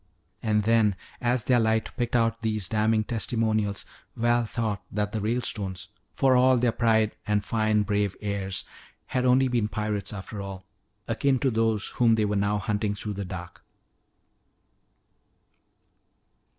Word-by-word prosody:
And 105 -1 +1
then 110 -2 +3 0.3
as 120 -1 +1
their 125 +1 +3
light 110 0 +1
picked 120 -1 -1
out 115 -1 +1
these 110 -4 -1
damning 110 +1 +2
testimonials, 110 -2 -1 0.3
Val 120 0 +2
thought 110 -3 -2
that 105 0 -1
the 110 - -2
Ralestones, 105 -5 -2 0.3
for 135 -2 +4
all 130 0 +5
their 120 0 +2
pride 110 -2 +2
and 105 -1 +1
fine, 110 -1 +2
brave 100 -1 0
airs, 100 -3 -3 0.4
had 125 - -1
been - - +4
only 125 -3 +3
pirates 105 -2 -2
after 100 0 -7
all, 95 -1 -7 0.4
akin 130 +4 +1
to 130 +1 +1
those 110 -2 +1
whom 115 -2 +3
they 110 -1 +1
were 105 0 -1
now 100 +1 +1
hunting 105 -1 -1
through 105 +1 -4
the 100 0 -4
dark. 90 -1 -8
110 Hz, 145 wpm, -26 LUFS, 105-115 Hz, 0.4 s, all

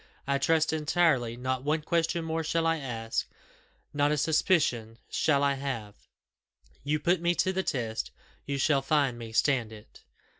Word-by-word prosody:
"I 140 0 0
trust 160 +2 +2
entirely. 150 -7 +1
Not 130 +1 -2
one 150 +2 0
question 165 0 0
more 160 0 -2
shall 165 +1 0
I 165 0 +2
ask 115 -5 -3 0.7
not 145 0 +2
a 150 - +1
suspicion 145 -8 +1
shall 145 -3 +2
I 140 0 +3
have: 130 -7 -4 0.9
you 150 +2 0
put 175 +3 +1
me 175 0 +2
to 185 +3 +1
the 190 - 0
test, 115 -9 -2 0.4
you 140 0 -1
shall 140 0 +2
find 135 -3 +1
me 115 -1 -7
stand 120 -1 +1
it." 110 -1 -14
140 Hz, 160 wpm, -28 LUFS, 125-160 Hz, 0.9 s, I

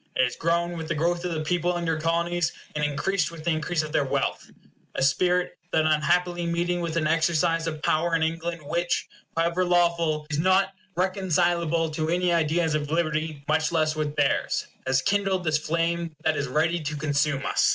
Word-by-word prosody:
It - - +3
has 125 - 0
grown 170 +1 0
with 160 -1 -5
the - - -1
growth 170 +3 0
of 175 - -1
the 155 - -2
people 175 +2 0
in 170 - -3
your 165 -1 0
Colonies, 170 +1 0 0.2
and 150 - -1
increased 155 +4 0
with 165 -2 -10
the 170 - +1
increase 155 +1 0
of 155 - -6
their 150 - +2
wealth; 135 - -2 0.5
a - - 0
spirit 180 +6 +1
that 160 -1 +2
unhappily 175 +3 +1
meeting 175 +1 0
with 170 -1 -3
an 160 - +1
exercise 165 +1 +2
of 155 -1 -5
power 165 +2 +2
in 160 - +1
England 165 +1 -2
which, 170 +3 -1 0.3
however 170 +2 +2
lawful, 170 -3 +2
is 150 - 0
not 185 +3 +3 0.3
reconcilable 175 -3 +1
to 155 0 -2
any 175 +1 +2
ideas 165 0 +1
of 150 -1 -1
liberty, 155 -2 -1
much 155 +1 +1
less 155 -2 +1
with 150 -1 -2
theirs, 145 -2 +1 0.2
has 130 0 +2
kindled 195 -2 +1
this 155 -2 +1
flame 165 +1 -1
that 160 -1 +2
is 140 -2 -2
ready 160 +6 +1
to 150 -1 -4
consume 145 -1 0
us. - - +3
165 Hz, 195 wpm, -25 LUFS, 155-175 Hz, 0.5 s, It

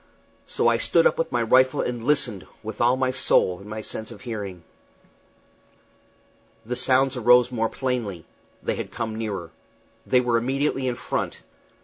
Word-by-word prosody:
So - - +1
I - - +4
stood - - +3
up 485 0 +3
with - - -1
my - - +1
rifle 130 0 +4
and 120 -2 -3
listened, 120 -8 0 0.2
with 110 0 -6
all 120 +2 +4
my 130 -1 +1
soul 95 -8 +2
in 100 +1 -12
my 110 0 -5
sense 110 +1 -7
of 110 -4 -11
hearing. 100 -7 -6 2.0
The 125 +2 -3
sounds 130 +1 +2
arose 125 0 +5
more 115 -2 0
plainly. 115 - -3 0.4
They - - -1
had - - -5
come 115 -2 -4
nearer. 100 -7 -4 0.6
They 125 - +4
were 120 -2 +2
immediately 135 +2 0
in 125 - -1
front. - - -3
120 Hz, 160 wpm, -24 LUFS, 110-130 Hz, 2.0 s, arose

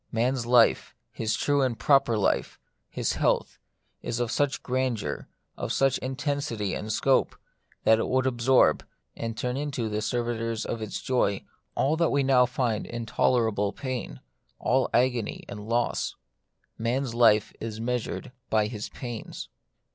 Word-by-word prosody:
Man's 120 +1 0
life, 120 -2 +4 0.2
his 110 0 -1
true 145 +4 +1
and 125 -3 0
proper 135 -5 +3
life, 105 - 0 0.3
his - - -1
health, - - 0 0.4
is 120 - -3
of 120 -2 -1
such 145 -1 0
grandeur, 130 -4 -2 0.3
of - - -4
such 135 -2 +2
intensity 130 -6 -2
and 110 - -4
scope, 130 +5 +2 0.5
that 110 0 +5
it - - 0
would 130 0 +1
absorb, 130 0 +3 0.3
and 115 -1 -4
turn 125 +3 -2
into 135 -6 -2
the 105 0 -2
servitors 115 -1 -2
of 115 - -3
its 110 - -5
joy, 110 -6 +1 0.3
all 145 +4 +2
that 170 -1 +3
we 140 -1 +2
now 130 -2 +5
find 120 -4 -1
intolerable 115 -2 +1
pain, 125 - -5 0.4
all 130 +2 +1
agony 120 -3 +1
and 105 +1 -8
loss. 120 +1 0 0.6
Man's 120 +2 -1
life 115 -3 +4
is 110 -1 -5
measured 125 +2 -3 0.2
by 110 -1 +3
his 105 -1 -5
pains. 120 -4 -7
120 Hz, 145 wpm, -27 LUFS, 110-130 Hz, 0.6 s, that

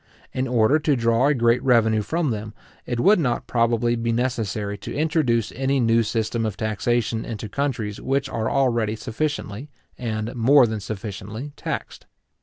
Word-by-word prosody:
In 130 +1 -1
order 125 +4 +3
to 150 -1 +2
draw 115 +2 +2
a 150 - +3
great 120 0 +3
revenue 110 -4 +3
from 155 +6 -1
them, 110 -1 -5 0.3
it 120 -1 -2
would 195 - +5
not 125 -7 0
probably 120 0 +1
be 115 0 -1
necessary 110 -4 -1
to 100 - -7
introduce 145 -8 +1
any 135 +1 0
new 115 -1 +3
system 115 +1 -1
of 110 -4 -3
taxation 110 +1 -1
into 110 -1 -5
countries 115 -4 -3
which 135 +1 0
are 110 -4 -2
already 120 -5 +1
sufficiently, 130 +1 -4 0.3
and 110 -2 -3
more 130 +3 +6
than 110 -2 -3
sufficiently, 105 +6 -6
taxed. - - -5
115 Hz, 160 wpm, -23 LUFS, 110-135 Hz, 0.3 s, more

